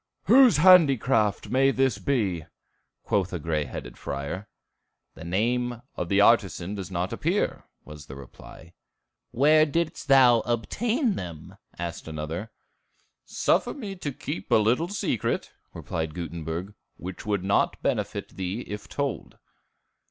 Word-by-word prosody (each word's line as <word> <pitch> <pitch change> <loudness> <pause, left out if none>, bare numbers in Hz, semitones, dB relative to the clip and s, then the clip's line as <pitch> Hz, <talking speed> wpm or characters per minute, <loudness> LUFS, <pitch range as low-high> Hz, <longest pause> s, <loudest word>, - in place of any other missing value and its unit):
"Whose 250 - +6
handicraft 135 - +4
may 135 +2 +3
this 135 -2 +1
be?" 95 - -1 0.6
quoth 95 -3 0
a - - -1
gray 75 -2 -1
headed 60 -2 -8
friar. 70 +9 -5 0.7
"The - - -11
name 120 +7 -1
of 85 - -4
the 100 - +3
artisan 100 -4 +3
doth 95 -4 -6
not 90 0 -2
appear," - - -1 0.2
was 75 -1 -11
the 65 - -9
reply. 80 +4 -13 0.6
"Where 155 +5 +5
didst 165 +2 -2
thou 130 -4 +6
obtain 220 - -1
them?" 85 -4 -8 0.2
asked 85 -2 -5
another. 80 +6 -5 0.8
"Suffer - - +1
me 210 -9 -6
to 150 -5 -4
keep 95 -6 -6
a - - +4
little 115 +10 +2
secret," 195 - -2 0.2
replied 80 -1 -4
Gutenberg, 85 +3 -5 0.2
"which 90 +3 -8
would 100 -3 0
not 100 +1 +1
benefit - - -2
thee 95 +5 -4
if 105 -3 -7
told." 140 -4 -4
105 Hz, 130 wpm, -26 LUFS, 85-135 Hz, 0.8 s, Whose